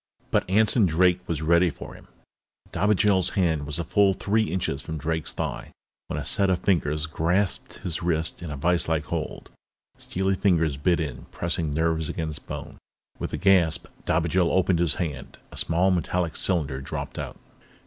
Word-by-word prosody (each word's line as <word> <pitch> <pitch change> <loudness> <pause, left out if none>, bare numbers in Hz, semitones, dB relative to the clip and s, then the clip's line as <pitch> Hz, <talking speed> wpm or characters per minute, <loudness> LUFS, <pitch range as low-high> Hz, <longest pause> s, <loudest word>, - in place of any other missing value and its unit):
But - - +1
Anson 110 +1 +4
Drake 90 +2 +3
was 80 -2 -2
ready 85 +2 +4
for - - -9
him. - - -15 0.6
Dobigel's 100 -1 +3
hand 80 -6 +1
was 75 +1 -2
a 85 - -2
full 100 +2 +3
three 110 +3 +1
inches 95 -3 -2
from 80 - -5
Drake's 80 +2 -2
thigh - - -4 0.4
when - - -3
a - - -5
set 100 -1 +1
of 95 - +3
fingers 80 -6 0
grasped 85 +5 0
his 85 0 -2
wrist 80 -1 -1
in 85 - -6
a 75 - -5
viselike 80 0 +1
hold. 80 0 -5 0.5
Steely 95 +1 -1
fingers 85 -6 +2
bit 85 +5 +1
in, 80 -3 -4
pressing 85 -2 -2
nerves 80 +1 0
against 80 -3 -4
bone. - - -7 0.4
With - - -4
a - - -2
gasp, 90 -5 +3 0.2
Dobigel 85 +1 +2
opened 95 -2 +2
his 85 -4 +1
hand. 75 -7 -5
A - - -11
small, 90 +3 +2
metallic 90 -1 -1
cylinder 75 -8 0
dropped 70 - -5
out. - - -6
85 Hz, 170 wpm, -25 LUFS, 80-95 Hz, 0.6 s, Anson